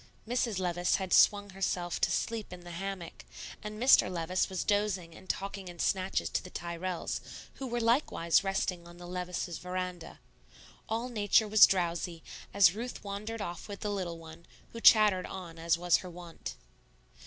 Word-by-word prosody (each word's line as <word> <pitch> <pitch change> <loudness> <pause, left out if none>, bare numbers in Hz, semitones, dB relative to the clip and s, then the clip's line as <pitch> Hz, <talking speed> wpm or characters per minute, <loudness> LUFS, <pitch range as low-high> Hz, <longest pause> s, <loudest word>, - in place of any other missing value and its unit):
Mrs. 235 -3 0
Levice 175 -1 +1
had 190 -2 -2
swung 205 -1 +5
herself 180 -2 -2
to - - +3
sleep 220 +4 -2
in 180 0 -9
the 175 0 -10
hammock, 185 0 -6 0.4
and 210 0 -7
Mr. 250 -6 +6
Levice 180 +2 -1
was 190 -1 -2
dozing 205 -5 0
and 185 +3 -15
talking 195 -1 -3
in 175 -1 -9
snatches 185 +2 0
to - - -1
the 180 - -9
Tyrrells, 175 +1 -4 0.4
who 265 - -4
were 240 0 -2
likewise 230 - +2
resting 185 -3 -2
on 175 0 -13
the 175 - -10
Levices' 180 -1 -4
veranda. 180 -1 -5 0.7
All 230 +3 -1
Nature 215 -2 +3
was 215 0 +8
drowsy, 170 -2 -1 0.3
as 190 -4 +6
Ruth 240 +4 -6
wandered 210 +2 -5
off 175 -3 -6
with 200 -1 -8
the 210 - -2
little 180 -4 -3
one, 165 +1 -13 0.2
who 230 - -8
chattered 210 -5 +6
on 170 -3 -8
as 165 0 +2
was 175 0 +3
her 185 - -8
wont. 175 -1 -8
185 Hz, 170 wpm, -31 LUFS, 175-205 Hz, 0.7 s, was